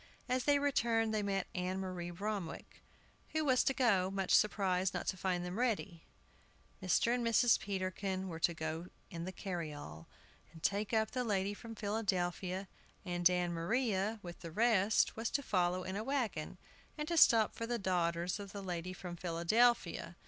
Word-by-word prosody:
As 255 -1 0
they 290 -1 +5
returned 230 -6 +1
they 215 - +1
met 195 -2 -1
Ann 185 +1 -2
Maria 180 -2 -4
Bromwick, 195 -1 -5 0.5
who 315 -1 +1
was 255 -3 +4
to - - +3
go, 215 -9 +2
much 195 -1 -1
surprised 190 -3 +2
not - - -2
to - - -1
find 180 -1 -1
them 180 +5 -4
ready. 200 -8 -1 0.8
Mr. 190 +5 +2
and 245 -1 0
Mrs. 230 +1 +4
Peterkin 190 -1 -3
were 165 -3 -6
to 170 +1 +2
go 160 +2 -4 0.2
in 170 0 -5
the 185 - -4
carryall, 155 - -6 0.4
and 160 -1 -14
take 205 +1 0
up 220 -1 +1
the 250 - -1
lady 200 -3 0
from 225 +2 -9
Philadelphia, 190 -3 -1 0.4
and 175 -1 +3
Ann 180 -1 0
Maria, 210 +3 0
with 175 -1 -8
the 165 - -7
rest, 215 +1 +3
was 225 +1 -2
to 280 - -1
follow 180 -4 +1
in 185 +1 -4
a 210 - -2
wagon, 225 - -2 0.4
and 300 0 -3
to 340 - -1
stop 230 -8 +6
for 230 - -5
the 240 0 0
daughters 175 -2 0
of 200 -1 -8
the 200 -1 -6
lady 180 -1 -4
from 180 -1 -7
Philadelphia. 175 +2 +1
190 Hz, 175 wpm, -35 LUFS, 175-225 Hz, 0.8 s, stop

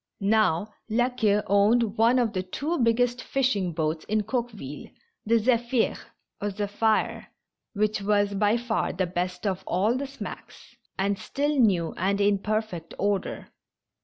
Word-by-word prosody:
Now, 215 -1 +2 0.2
La 240 +3 +2
Queue 210 -4 +2
owned 210 +2 +3
one 230 +3 +4
of 240 -3 +2
tlie 185 -2 -4
two 320 +4 -2
biggest 245 +1 +2
fishing 230 -10 0
boats 155 -1 -2
in 215 0 0
Coqueville, 215 - -4 0.4
the 230 - +4
Zephir 235 +1 +1 0.5
(Zephyr), 205 +2 0 0.5
which 215 0 0
was 205 0 +2
by 210 +3 +2
far 235 -2 -1
the 185 +1 0
best 180 +2 -3
of 190 -2 -1
all 200 +7 +1
the 275 +2 -3
smacks, 275 +1 -10 0.2
and 195 0 0
still 290 +6 -1
new 190 - +2
and 195 +3 0
in 200 -1 +3
per 215 +2 0
fect 175 -6 -9
order. 200 -1 -2
210 Hz, 145 wpm, -26 LUFS, 195-235 Hz, 0.5 s, one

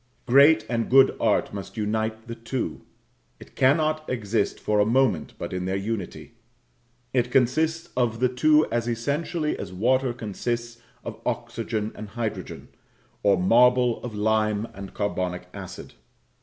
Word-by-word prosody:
Great 140 -1 +6
and 115 -1 -1
good 135 +1 +6
art - - +1
must 100 +2 -7
unite 110 +1 -2
the 115 - -5
two; 115 +2 -4 0.6
it - - -15
cannot 155 +3 +2
exist 110 -4 -1
for 105 -1 0
a - - +6 0.2
moment 105 -12 0
but - - -6
in 90 0 -3
their 95 +1 -1
unity; 105 +1 -5 0.8
it 125 -1 +1
consists 155 +7 +1
of 120 -3 0
the 125 - +3
two 150 +5 +4
as 120 0 -1
essentially 145 +7 -1
as 95 - -6
water 125 +7 +1
consists 120 +1 -4 0.2
of - - -8
oxygen 110 -2 -3
and 105 -1 -9
hydrogen, 110 0 -5 0.5
or 100 -2 +4
marble 125 +5 +4
of 120 -3 -6
lime 105 0 +1
and 100 0 -9
carbonic 90 -3 -2
acid. - - -9
115 Hz, 140 wpm, -25 LUFS, 105-130 Hz, 0.8 s, Great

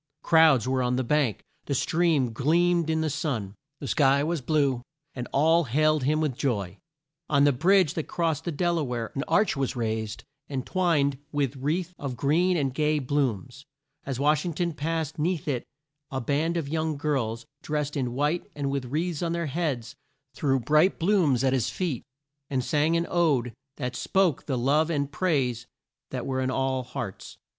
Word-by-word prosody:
Crowds 160 -8 +5
were 130 0 +1
on 125 0 +1
the 130 - 0
bank, 135 -3 +1 0.2
the 140 - 0
stream 155 -5 +1
gleamed 170 +5 +2
in 160 0 +1
the 160 - 0
sun, 135 - -2 0.3
the 140 - -6
sky 140 0 +3
was 165 -1 -1
blue, 140 -3 +1 0.3
and 125 -2 -5
all 160 +4 +3
hailed 155 +4 +2
him 155 +2 +2
with 155 -4 0
joy. 105 -9 -2 0.5
On 140 -1 +4
the 145 - +5
bridge 175 +4 +3
that 160 - -3
crossed 160 -3 -1
the 170 - -1
Del 170 +2 0
a - - 0
ware 120 -4 -3
an 135 - -2
arch 210 -4 +3
was 135 -2 -1
raised 110 -2 -3 0.2
and 135 -3 -4
twined 150 -7 +1
with 140 -2 -1
wreaths 160 +7 -2
of 135 -4 -4
green 170 +8 +2
and 135 -4 0
gay 150 +2 +1
blooms. 130 -2 -2 0.4
As 135 -2 -4
Wash 150 +2 +3
ing 170 -3 -3
ton 170 0 -1
passed 160 0 -3
'neath 165 0 -1
it 130 -5 -1 0.4
a 135 - -3
band 150 +6 0
of 160 -4 -2
young 155 0 -1
girls, 125 -6 -1 0.2
drest 150 -1 -2
in 125 -4 -1
white 150 +6 -1
and 140 -2 -2
with 140 -2 -2
wreaths 155 +5 -2
on 170 -1 -1
their 170 0 -1
heads, 145 -6 -2 0.4
threw 135 -3 +1
bright 150 - +3
blooms 165 - +2
at 130 -1 +3
his 130 -3 +1
feet, 165 -10 -2 0.5
and 130 -3 -1
sang 155 +1 +2
an 170 - 0
ode 140 -9 +1 0.2
that 125 -3 -3
spoke 185 0 +1
the 135 -4 0
love 145 +6 +2
and 145 -3 -1
praise 135 -8 0 0.4
that 125 -2 -4
were 130 -1 -1
in 130 - 0
all 130 0 0
hearts. 120 -5 -7
145 Hz, 185 wpm, -26 LUFS, 130-160 Hz, 0.5 s, Crowds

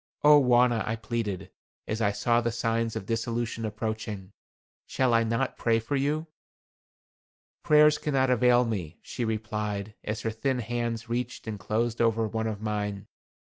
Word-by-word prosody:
"Oh, 150 0 +8
Wauna," 120 -2 +4
I 110 - 0
pleaded, 110 -4 -4 0.4
as 110 +1 -2
I 100 -2 +3
saw 120 +3 +2
the 115 0 -1
signs 115 -1 -1
of 110 -3 -4
dissolution 115 0 -2
approaching, 110 -2 -4 0.6
"shall 130 -2 +1
I 115 0 +4
not 115 +4 -1
pray 115 -1 +3
for 115 +5 -3
you?" 145 +3 0 1.4
"Prayers 150 0 +5
cannot 135 -3 +1
avail 125 0 +4
me," 90 -8 -4
she 125 - -4
replied, 105 -2 -3
as 105 +1 -3
her 115 - -1
thin 130 +4 -1
hands 120 0 -3
reached 120 +1 -3
and 110 -2 -5
closed 115 +4 -1
over 115 -1 +2
one 110 +1 -2
of 110 -1 -4
mine. 105 -2 -3
115 Hz, 155 wpm, -27 LUFS, 110-120 Hz, 1.4 s, Oh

